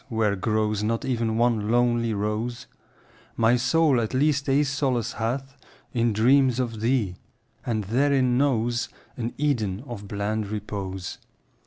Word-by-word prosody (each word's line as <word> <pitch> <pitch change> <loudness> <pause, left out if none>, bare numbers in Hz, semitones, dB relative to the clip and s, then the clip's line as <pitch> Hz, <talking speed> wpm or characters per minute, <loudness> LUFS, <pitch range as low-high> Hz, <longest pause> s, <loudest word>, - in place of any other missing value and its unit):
where 110 -4 +1
grows 110 +1 0
Not 115 +4 -1
even 115 -4 0
one 115 -3 +1
lonely 120 -1 +2
rose)— 110 +4 -2 0.7
My 115 +1 +4
soul 130 +1 +3
at 110 +2 -3
least 145 0 +2
a 140 +2 +4
solace 135 -4 -1
hath 130 +4 -3 0.4
In 120 -2 +2
dreams 125 +3 +4
of 115 -4 -2
thee, 115 -7 0 0.5
and 115 -5 -1
therein 130 +3 +2
knows 120 -3 +1 0.3
An 120 -1 -3
Eden 120 -8 0
of 105 -6 -7
bland 105 +1 -2
repose. 100 -3 -5
115 Hz, 135 wpm, -25 LUFS, 110-130 Hz, 0.7 s, My